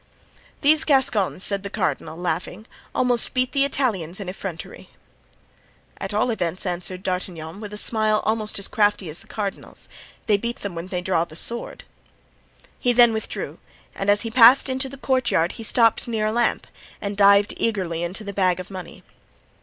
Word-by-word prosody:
"These 310 Hz, +2 st, +5 dB
Gascons," 240 Hz, -, +1 dB
said 200 Hz, -1 st, +1 dB
the 200 Hz, -, -6 dB
cardinal, 175 Hz, -6 st, -2 dB
laughing, 180 Hz, +3 st, -3 dB, 0.3 s
"almost 245 Hz, 0 st, +2 dB
beat 255 Hz, 0 st, +1 dB
the 275 Hz, -1 st, +2 dB
Italians 215 Hz, -, -1 dB
in 200 Hz, -, -6 dB
effrontery." 185 Hz, -2 st, -7 dB, 1.1 s
"At -, -, -4 dB
all 215 Hz, +4 st, +1 dB
events," 180 Hz, -3 st, -3 dB
answered 180 Hz, +1 st, -3 dB
D'Artagnan, 180 Hz, -2 st, -4 dB
with 210 Hz, -1 st, -8 dB
a 210 Hz, -, -7 dB
smile 215 Hz, 0 st, +1 dB
almost 215 Hz, -1 st, 0 dB
as 200 Hz, -, -1 dB
crafty 205 Hz, -5 st, +1 dB
as 160 Hz, -, -8 dB
the -, -, -18 dB
cardinal's, 200 Hz, -3 st, -6 dB, 0.4 s
"they 210 Hz, -3 st, +3 dB
beat 235 Hz, +3 st, -5 dB
them 200 Hz, -3 st, -4 dB
when 170 Hz, +1 st, -6 dB
they 180 Hz, -1 st, -3 dB
draw 180 Hz, -2 st, +1 dB
their 155 Hz, -2 st, -11 dB
swords." 235 Hz, +7 st, 0 dB, 1.0 s
He 245 Hz, -, +2 dB
then 240 Hz, -1 st, +6 dB
withdrew, 220 Hz, -, -5 dB, 0.3 s
and 195 Hz, -, -3 dB
as 205 Hz, 0 st, +4 dB
he 230 Hz, -, -4 dB
passed 250 Hz, +3 st, +7 dB
into 260 Hz, +1 st, 0 dB
the 275 Hz, -, -10 dB
courtyard 255 Hz, -11 st, +1 dB
he 225 Hz, -, -8 dB
stopped 230 Hz, +1 st, +3 dB
near 220 Hz, -2 st, -1 dB
a 215 Hz, -, +1 dB
lamp 240 Hz, 0 st, +1 dB, 0.3 s
and 200 Hz, 0 st, -4 dB
dived 200 Hz, 0 st, +5 dB
eagerly 185 Hz, -7 st, -1 dB
into 180 Hz, +5 st, -5 dB
the 200 Hz, -1 st, -6 dB
bag 185 Hz, -2 st, +1 dB
of 185 Hz, +2 st, -8 dB
money. 185 Hz, -3 st, -9 dB
205 Hz, 175 wpm, -23 LUFS, 185-235 Hz, 1.1 s, passed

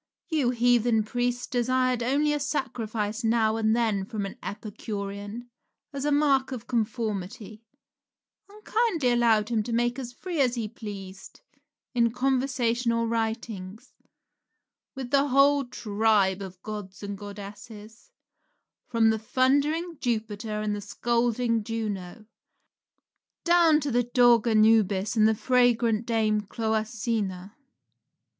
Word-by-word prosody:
Your 275 Hz, -6 st, +1 dB
heathen 240 Hz, -2 st, +3 dB
priests 245 Hz, +2 st, -2 dB
desired 255 Hz, 0 st, 0 dB
only 285 Hz, +5 st, +1 dB
a 295 Hz, -, -1 dB
sacrifice 230 Hz, -6 st, -3 dB
now 225 Hz, -1 st, +2 dB
and 220 Hz, 0 st, +2 dB
then 220 Hz, -5 st, +1 dB
from 205 Hz, 0 st, -4 dB
an 195 Hz, -, -7 dB
Epicurean 205 Hz, +2 st, -6 dB, 0.4 s
as 280 Hz, 0 st, -4 dB
a 295 Hz, -, +1 dB
mark 280 Hz, -2 st, +2 dB
of 240 Hz, -3 st, -6 dB
conformity, 220 Hz, -3 st, -3 dB, 0.9 s
and 425 Hz, +1 st, -17 dB
kindly 380 Hz, -, +1 dB
allowed 230 Hz, -3 st, +3 dB
him 230 Hz, -2 st, +1 dB
to 235 Hz, -, -5 dB
make 240 Hz, +2 st, 0 dB
as 245 Hz, -2 st, -6 dB
free 335 Hz, +4 st, -3 dB
as 250 Hz, -2 st, +2 dB
he 230 Hz, -3 st, -2 dB
pleased, 195 Hz, -3 st, -9 dB, 0.5 s
in 235 Hz, -2 st, +3 dB
conversation 250 Hz, -2 st, 0 dB
or 230 Hz, 0 st, 0 dB
writings, 220 Hz, -3 st, -4 dB, 1.0 s
with 260 Hz, -2 st, -6 dB
the 280 Hz, 0 st, +3 dB
whole 280 Hz, +1 st, +4 dB
tribe 210 Hz, -4 st, +1 dB
of 185 Hz, -2 st, -8 dB
gods 205 Hz, -3 st, -7 dB
and 200 Hz, 0 st, -4 dB
goddesses 210 Hz, -, -10 dB, 0.8 s
from 225 Hz, -2 st, +3 dB
the 220 Hz, -, -1 dB
thundering 285 Hz, +8 st, +1 dB
Jupiter 215 Hz, -3 st, -2 dB
and 210 Hz, -1 st, -1 dB
the 205 Hz, -, -5 dB
scolding 235 Hz, +1 st, 0 dB
Juno, 215 Hz, -2 st, -5 dB, 1.2 s
down 340 Hz, -3 st, +5 dB
to 285 Hz, -1 st, -2 dB
the 245 Hz, +1 st, +3 dB
dog 240 Hz, -1 st, +4 dB
Anubis 215 Hz, -2 st, +3 dB
and 215 Hz, -1 st, +5 dB
the 220 Hz, -, +2 dB
fragrant 235 Hz, -2 st, +2 dB
dame 215 Hz, -2 st, +1 dB
Cloacina. 215 Hz, -3 st, -2 dB
230 Hz, 125 wpm, -26 LUFS, 215-250 Hz, 1.2 s, down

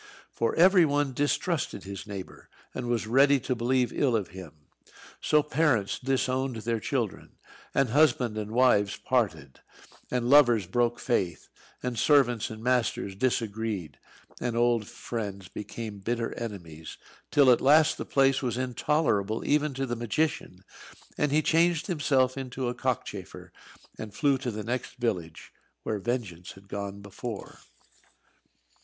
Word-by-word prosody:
For 115 Hz, -, -1 dB
every 185 Hz, +1 st, +6 dB
one 145 Hz, -3 st, +1 dB
distrusted 145 Hz, -, -1 dB
his 100 Hz, +1 st, -8 dB
neighbour, 100 Hz, -3 st, -9 dB, 0.2 s
and 125 Hz, -1 st, -4 dB
was 120 Hz, -3 st, 0 dB
ready 135 Hz, +5 st, +4 dB
to 130 Hz, -, -1 dB
believe 125 Hz, +1 st, 0 dB
ill 130 Hz, -5 st, +1 dB
of 105 Hz, -4 st, -1 dB
him. 80 Hz, -5 st, -12 dB, 0.6 s
So 150 Hz, -1 st, +3 dB
parents 150 Hz, -9 st, +1 dB
disowned 130 Hz, 0 st, -1 dB
their 115 Hz, +1 st, -2 dB
children, 115 Hz, -3 st, -3 dB, 0.4 s
and 135 Hz, -3 st, +3 dB
husband 125 Hz, -4 st, +3 dB
and 105 Hz, -1 st, -4 dB
wives 110 Hz, -4 st, +3 dB
parted, 80 Hz, -, -1 dB, 0.5 s
and 125 Hz, -1 st, -1 dB
lovers 120 Hz, -7 st, +5 dB
broke 120 Hz, +5 st, 0 dB
faith; 95 Hz, -9 st, -1 dB, 0.3 s
and 125 Hz, -3 st, -2 dB
servants 125 Hz, -7 st, +3 dB
and 110 Hz, 0 st, -9 dB
masters 125 Hz, -5 st, 0 dB
disagreed; 110 Hz, -, -2 dB, 0.4 s
and 120 Hz, -1 st, -2 dB
old 120 Hz, -3 st, +2 dB
friends 105 Hz, -5 st, -6 dB
became 105 Hz, 0 st, -7 dB
bitter 115 Hz, +3 st, -2 dB
enemies, 85 Hz, -9 st, -8 dB, 0.3 s
till 140 Hz, -3 st, +5 dB
at 120 Hz, -, +3 dB
last 150 Hz, +3 st, +5 dB
the -, -, -2 dB
place 135 Hz, -1 st, +2 dB
was 125 Hz, -3 st, -2 dB
intolerable 120 Hz, -4 st, 0 dB
even 150 Hz, -1 st, +1 dB
to 135 Hz, +1 st, -1 dB
the 120 Hz, -2 st, -3 dB
magician, 115 Hz, -, -2 dB, 0.5 s
and 150 Hz, -1 st, 0 dB
he 155 Hz, +2 st, +3 dB
changed 165 Hz, 0 st, +2 dB
himself 135 Hz, -6 st, +1 dB
into 130 Hz, -1 st, -4 dB
a -, -, -2 dB
cockchafer, -, -, -4 dB, 0.5 s
and 105 Hz, -2 st, -7 dB
flew 140 Hz, -1 st, +2 dB
to 130 Hz, -2 st, -3 dB
the 105 Hz, -2 st, -5 dB
next 120 Hz, +2 st, -4 dB
village, 90 Hz, -10 st, -3 dB, 0.3 s
where, 105 Hz, -2 st, -2 dB
Vengeance 100 Hz, -6 st, -4 dB
had 100 Hz, 0 st, -17 dB
gone 100 Hz, 0 st, -5 dB
before. 100 Hz, +2 st, -7 dB
120 Hz, 140 wpm, -28 LUFS, 105-135 Hz, 0.6 s, every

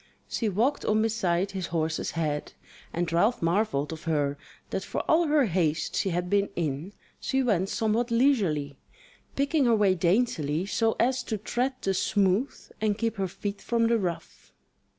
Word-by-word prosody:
She 225 Hz, -, -1 dB
walked 235 Hz, +9 st, +1 dB
on 215 Hz, +1 st, +2 dB
beside 195 Hz, -4 st, 0 dB
his 190 Hz, -3 st, -4 dB
horse's 160 Hz, -1 st, -1 dB
head; 150 Hz, -3 st, -2 dB, 0.4 s
and 170 Hz, -1 st, -2 dB
Ralph 210 Hz, +8 st, +3 dB
marvelled 165 Hz, -4 st, 0 dB
of 160 Hz, +3 st, -10 dB
her 145 Hz, -3 st, 0 dB, 0.4 s
that -, -, -2 dB
for -, -, -3 dB
all 325 Hz, +1 st, +3 dB
her 295 Hz, -2 st, +4 dB
haste 165 Hz, -5 st, 0 dB
she 195 Hz, -, +1 dB
had 175 Hz, 0 st, -1 dB
been 200 Hz, +2 st, +2 dB
in, 160 Hz, +3 st, -3 dB, 0.3 s
she 265 Hz, 0 st, 0 dB
went 195 Hz, -6 st, +1 dB
somewhat 225 Hz, +2 st, 0 dB
leisurely, 195 Hz, -, +1 dB, 0.6 s
picking 280 Hz, +1 st, +2 dB
her 235 Hz, -2 st, +4 dB
way 205 Hz, -3 st, +4 dB
daintily 170 Hz, -4 st, +1 dB
so 225 Hz, +2 st, +1 dB
as 255 Hz, +2 st, +2 dB
to 220 Hz, -, -2 dB
tread 245 Hz, +6 st, -1 dB
the 195 Hz, -, 0 dB
smooth, 195 Hz, +5 st, +1 dB, 0.2 s
and 210 Hz, -2 st, +1 dB
keep 225 Hz, -1 st, -1 dB
her 195 Hz, -1 st, 0 dB
feet 200 Hz, +3 st, -5 dB
from 235 Hz, -1 st, +1 dB
the 230 Hz, 0 st, +3 dB
rough. 175 Hz, -4 st, -5 dB
200 Hz, 170 wpm, -27 LUFS, 170-230 Hz, 0.6 s, her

